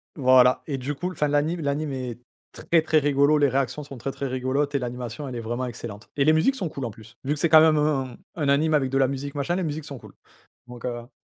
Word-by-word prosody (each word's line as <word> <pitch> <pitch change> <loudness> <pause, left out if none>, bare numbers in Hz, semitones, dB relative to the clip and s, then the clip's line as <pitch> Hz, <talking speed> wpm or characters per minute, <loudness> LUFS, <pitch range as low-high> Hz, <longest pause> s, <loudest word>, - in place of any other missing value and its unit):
Voilà 130 -2 +5
et 140 -3 -2
du 135 +3 -4
coup 180 +5 -3
enfin 150 -4 0
l'anime 150 +4 0
l'anime 145 0 -2
est 125 -3 -5 0.3
très, 165 -1 +1
très 155 0 +2
rigolo, 145 0 +3
les 145 -1 +4
réactions 135 +2 -1
sont 140 -2 -10
très, 135 +4 -3
très 140 - -5
rigolotes 130 +3 -1
et 140 - +1
l'animation, 125 +2 -5
elle 130 - -6
est 120 - -3
vraiment 120 +3 -3
excellente. 110 -3 -8
Et 140 - +3
les 155 - +5
musiques 170 +13 +3
sont 190 -8 -3
cools 140 -4 -5
en - - -3
plus, 110 0 -15
vu 140 +2 0
que - - -8
c'est 170 - +3
quand 155 0 +8
même 160 -1 +5
un 135 -4 0 0.2
un 150 -4 -1
anime 155 +3 +3
avec 140 -3 +2
de 135 - 0
la 135 -1 +4
musique, 140 +1 -5
machin. 145 +5 -1
Les 185 - -1
musiques 155 -1 -4
sont 140 -4 -8
cools. - - -15 0.5
Donc, 120 -1 -11
heu. 120 -1 -5
140 Hz, 260 wpm, -25 LUFS, 125-150 Hz, 0.5 s, quand